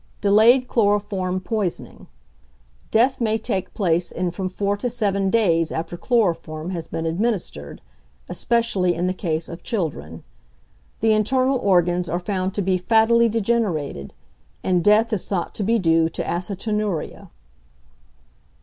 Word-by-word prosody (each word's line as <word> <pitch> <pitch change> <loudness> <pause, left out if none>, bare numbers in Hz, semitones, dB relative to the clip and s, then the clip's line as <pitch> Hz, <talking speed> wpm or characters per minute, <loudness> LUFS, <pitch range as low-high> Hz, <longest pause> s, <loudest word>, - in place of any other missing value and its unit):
Delayed 225 +5 +5
Chloroform 205 -5 0
Poisoning. 195 -2 -4 0.8
Death 245 +4 +2
may 220 -1 +1
take 195 -4 -3
place 175 -3 0
in 180 0 -2
from 185 +1 -4
four 200 +2 -1
to 245 +4 -2
seven 200 -5 0
days 170 -7 +2
after 165 +2 -4
chloroform 175 -7 -1
has 165 -3 -5
been 165 0 -4
administered, 170 - -3 0.5
especially 230 -7 0
in 175 +2 -1
the 185 - 0
case 165 -3 -3
of 170 0 -9
children. 140 - -4 0.8
The 220 0 +4
internal 255 +5 +1
organs 180 -3 +2
are 175 +2 -1
found 185 +1 -3
to 205 - -1
be 185 0 +1
fattily 230 +4 +4
degenerated, 195 - -1 0.5
and 180 -2 +1
death 220 +2 +4
is 200 - -2
thought 180 -4 -2
to 210 - -3
be 230 +4 +2
due 165 -4 +2
to - - -4
acetonuria. 200 0 -3
195 Hz, 135 wpm, -22 LUFS, 175-220 Hz, 0.8 s, Delayed